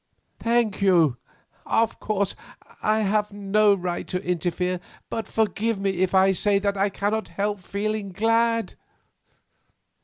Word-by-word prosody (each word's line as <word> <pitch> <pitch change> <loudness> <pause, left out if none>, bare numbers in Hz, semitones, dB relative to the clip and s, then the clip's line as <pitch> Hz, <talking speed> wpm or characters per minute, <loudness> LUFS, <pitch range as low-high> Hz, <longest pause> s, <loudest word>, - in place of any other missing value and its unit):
"Thank 230 -3 +1
you. 170 -10 +4 0.5
Of 225 0 +1
course, 200 -2 -1 0.5
I 215 +1 +2
have 210 0 +1
no 205 +1 +3
right 180 -2 -4
to 180 - -3
interfere, 180 +1 -1 0.3
but 225 - -3
forgive 220 0 0
me 195 -2 -1
if 185 0 +1
I 190 +1 +5
say 200 +2 +2
that 200 0 0
I 200 +1 +1
cannot 205 +3 -2
help 205 0 -2
feeling 205 +2 -3
glad. 230 +3 +1
200 Hz, 130 wpm, -24 LUFS, 190-215 Hz, 0.5 s, I